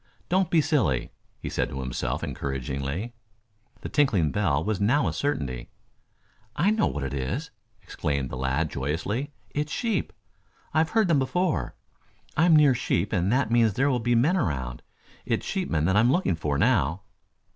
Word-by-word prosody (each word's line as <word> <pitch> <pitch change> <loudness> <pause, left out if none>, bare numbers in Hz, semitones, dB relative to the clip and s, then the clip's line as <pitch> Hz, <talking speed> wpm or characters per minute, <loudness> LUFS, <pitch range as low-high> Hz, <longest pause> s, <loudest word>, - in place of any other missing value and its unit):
Don't 185 -1 +2
be 165 -3 +4
silly," 105 - +1 0.3
he - - -7
said - - -1
to 65 - -5
himself 65 -2 -3
encouragingly. 70 - -3 0.7
The - - -5
tinkling 100 - +2
bell 80 -8 +1
was 105 +1 -1
now 125 +8 +3
a - - -1
certainty. 65 - -2 0.9
"I 200 +4 +3
know 215 -1 +2
what 75 - -3
it 65 0 -3
is!" 105 - -3 0.3
exclaimed 70 -7 -2
the - - -4
lad 65 +5 -1
joyously. 80 - -2 0.2
"It's 150 +1 -2
sheep! 225 +1 -1 0.6
I've 160 +1 +2
heard 220 -3 +2
them 160 -5 +3
before. 135 - 0 0.6
I'm 165 +1 +5
near 150 -3 +6
sheep 105 -3 -1
and 95 0 +1
that 130 -2 +1
means 115 -3 +4
there 135 +2 +2
will 125 - +1
be 120 +1 +1
men 150 +11 +3
around. 65 - -2 0.4
It's - - -1
sheepmen 75 +2 -1
that 95 +3 +2
I - - +6
am 120 +3 +4
looking 175 - +2
for 75 -3 -1
now." 80 +7 +2
105 Hz, 170 wpm, -26 LUFS, -, 0.9 s, near